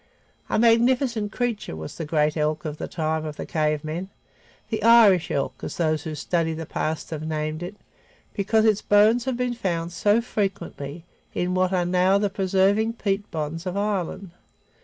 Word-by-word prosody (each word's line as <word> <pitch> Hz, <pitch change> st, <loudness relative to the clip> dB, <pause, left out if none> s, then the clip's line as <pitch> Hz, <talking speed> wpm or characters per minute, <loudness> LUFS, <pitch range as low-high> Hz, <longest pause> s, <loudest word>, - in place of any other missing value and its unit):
A -, -, +1 dB
magnificent 235 Hz, -1 st, +3 dB
creature 235 Hz, -, -2 dB
was 80 Hz, 0 st, -7 dB
the 165 Hz, -, -5 dB
great 150 Hz, 0 st, +1 dB
elk 155 Hz, +1 st, -1 dB
of 150 Hz, -1 st, -5 dB
the -, -, -4 dB
time 160 Hz, -1 st, -2 dB
of 155 Hz, -1 st, -5 dB
the -, -, -6 dB
cave 155 Hz, -2 st, 0 dB
men, 170 Hz, +5 st, -4 dB, 0.6 s
the 220 Hz, -1 st, -1 dB
Irish 215 Hz, -6 st, +6 dB
elk, 140 Hz, -, -2 dB
as -, -, -5 dB
those 155 Hz, -2 st, +1 dB
who 155 Hz, -1 st, -4 dB
study 165 Hz, 0 st, -1 dB
the 165 Hz, 0 st, -5 dB
past 155 Hz, +2 st, -3 dB
have 155 Hz, -2 st, -4 dB
named 155 Hz, 0 st, -3 dB
it, 180 Hz, +4 st, -6 dB, 0.6 s
because 215 Hz, +2 st, +2 dB
its 215 Hz, -2 st, +3 dB
bones 215 Hz, +4 st, +4 dB
have 260 Hz, -2 st, -1 dB
been 250 Hz, -1 st, -1 dB
found 175 Hz, -7 st, -2 dB
so 205 Hz, +5 st, +3 dB
frequently 175 Hz, -, -4 dB, 0.3 s
in 180 Hz, +1 st, 0 dB
what 185 Hz, 0 st, +2 dB
are 180 Hz, -2 st, +1 dB
now 185 Hz, +2 st, +3 dB
the 200 Hz, -1 st, 0 dB
preserving 195 Hz, +3 st, +2 dB
peat 205 Hz, -2 st, -2 dB
bogs 165 Hz, +2 st, -4 dB
of 180 Hz, +2 st, -3 dB
Ireland. 195 Hz, -2 st, -2 dB
185 Hz, 180 wpm, -24 LUFS, 155-210 Hz, 0.6 s, Irish